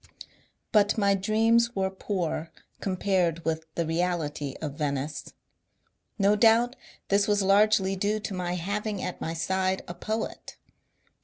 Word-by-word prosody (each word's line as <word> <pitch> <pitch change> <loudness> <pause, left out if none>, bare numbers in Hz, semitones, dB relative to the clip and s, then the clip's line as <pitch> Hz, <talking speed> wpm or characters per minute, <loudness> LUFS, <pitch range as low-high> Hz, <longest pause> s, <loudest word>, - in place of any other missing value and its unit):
'* - - -32 0.3
But 210 -1 +3
my 200 -2 +3
dreams 225 +4 +2
were 190 -1 0
poor 180 -4 -3 0.3
compared 185 -3 0
with 160 0 -2
the 170 - 0
reality 160 -4 -2
of 150 -3 -4
Venice. 145 0 -3 0.9
No 200 0 +4
doubt 230 +3 +4 0.3
this 200 0 +3
was 205 -1 +2
largely 195 0 +4
due 205 +3 0
to 205 - -4
my 180 -1 -2
having 200 +3 -3
at 180 - -5
my 165 - -3
side 190 +2 0
a 175 - -5
poet. 220 +4 -5
190 Hz, 140 wpm, -27 LUFS, 170-210 Hz, 0.9 s, No